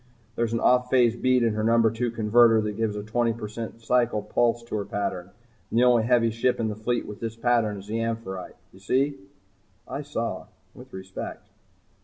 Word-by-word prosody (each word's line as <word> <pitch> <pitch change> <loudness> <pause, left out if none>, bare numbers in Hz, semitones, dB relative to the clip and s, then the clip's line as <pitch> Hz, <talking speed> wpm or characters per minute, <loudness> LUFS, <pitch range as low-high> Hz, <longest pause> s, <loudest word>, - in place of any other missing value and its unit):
There's 115 -1 0
an 115 - 0
off 125 +1 +3
phase 120 -3 +4
beat 130 0 +2
in 115 -2 +2
her 110 0 -2
number 115 0 +4
two 120 +2 -1
converter 115 0 +4
that 105 0 -2
gives 110 -1 -1
a 105 - -4
twenty 115 +1 0 0.4
cycle 115 -1 +1
pulse 120 0 +1
to 115 - -6
her 100 - -3
pattern. 95 -3 -3 0.4
And - - -2
the 120 - +5
only 125 -2 +5
heavy 115 0 +3
ship 115 +3 0
in 110 -1 0
the 105 - -4
fleet 120 +3 -2
with 105 -1 -9
this 115 -1 -4
pattern 115 -3 +1
is 100 +1 -11
'Amphitrite.' 115 -5 -4 0.2
You 95 - -16
see?" 135 +8 0 0.7
I 140 - -4
saw 115 -7 -4 0.3
with 130 +1 -14
respect. 95 0 -7
115 Hz, 190 wpm, -25 LUFS, 110-120 Hz, 0.7 s, the